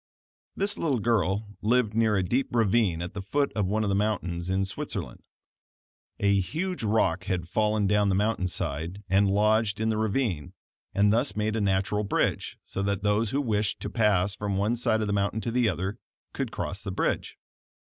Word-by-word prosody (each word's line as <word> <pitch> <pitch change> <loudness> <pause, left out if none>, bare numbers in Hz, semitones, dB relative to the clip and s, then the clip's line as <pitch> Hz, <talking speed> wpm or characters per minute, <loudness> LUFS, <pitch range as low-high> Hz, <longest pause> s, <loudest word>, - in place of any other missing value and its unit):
This 200 +1 -1
little 145 -6 +1
girl 105 -2 +1 0.2
lived 115 -1 +2
near 110 -2 +2
a 95 - +1
deep 125 +10 0
ravine 105 -6 +2
at 90 - -6
the 100 - -4
foot 140 +9 0
of 105 -4 0
one 110 +3 0
of 105 - 0
the - - +1
mountains 90 -4 -1
in 95 +1 +1
Switzerland. 95 - -6 0.9
A 100 0 +3
huge 170 - -3
rock 95 -4 +1
had 90 -3 -2
fallen 105 +2 +1
down 105 0 +3
the 95 - +2
mountain 105 -2 +1
side, 85 +4 -3
and 100 +1 +4
lodged 105 +1 +2
in 110 0 +1
the 110 -1 0
ravine, 110 - -1 0.4
and 105 +1 +4
thus 115 -3 +1
made 105 +1 0
a 110 - 0
natural 100 +1 +1
bridge, 100 - -1
so 95 - -5
that 100 0 -1
those 105 +2 +2
who 135 - 0
wished 105 -5 -1
to - - -4
pass 100 -4 +2
from 100 -2 -2
one 105 +4 +1
side 110 -2 +1
of - - 0
the 100 - 0
mountain 100 +2 0
to 115 - -2
the 120 -1 +2
other, 95 +3 -3 0.3
could - - -3
cross 95 - -4
the 100 - -5
bridge. - - -1
105 Hz, 195 wpm, -27 LUFS, 95-110 Hz, 0.9 s, and